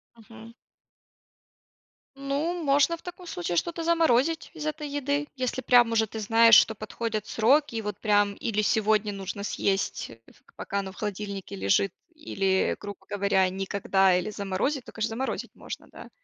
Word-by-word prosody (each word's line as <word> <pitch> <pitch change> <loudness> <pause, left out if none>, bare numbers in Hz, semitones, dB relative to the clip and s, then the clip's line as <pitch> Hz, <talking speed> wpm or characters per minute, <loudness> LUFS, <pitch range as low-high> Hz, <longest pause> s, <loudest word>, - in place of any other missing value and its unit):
Мгм. 225 0 -14 1.6
Ну, 285 +6 -2
можно 290 +3 +3
в - - -20
таком 355 0 -10
случае 175 - -3
что-то 335 - -1
заморозить 325 -2 +2
из 315 -3 -7
этой 305 0 -3
еды. 285 +1 -2
Если 255 0 -2
прям 245 -2 +5
уже 220 -1 +2
ты 220 - -7
знаешь, 225 +1 +6
что 220 - +5
подходят 215 0 -4
сроки. 265 +4 +2
И 225 - -1
вот 210 -1 -5
прям 205 -1 +2
или 215 -2 -1
сегодня 215 -1 +1
нужно 195 +1 -6
съесть, 195 -1 -1 0.4
пока 200 - -3
оно 195 -1 -5
в - - -17
холодильнике 200 - -5
лежит, 100 - +1 0.2
или, 195 -11 0
грубо 205 -1 -9
говоря, 200 -2 +2
никогда 195 0 +1
или 180 +3 -2
заморозить, 210 +7 -2
то, - - -11
конечно, 220 0 -2
заморозить 245 +4 -4
можно, - - -8
да. - - -12
220 Hz, 155 wpm, -27 LUFS, 200-275 Hz, 1.6 s, знаешь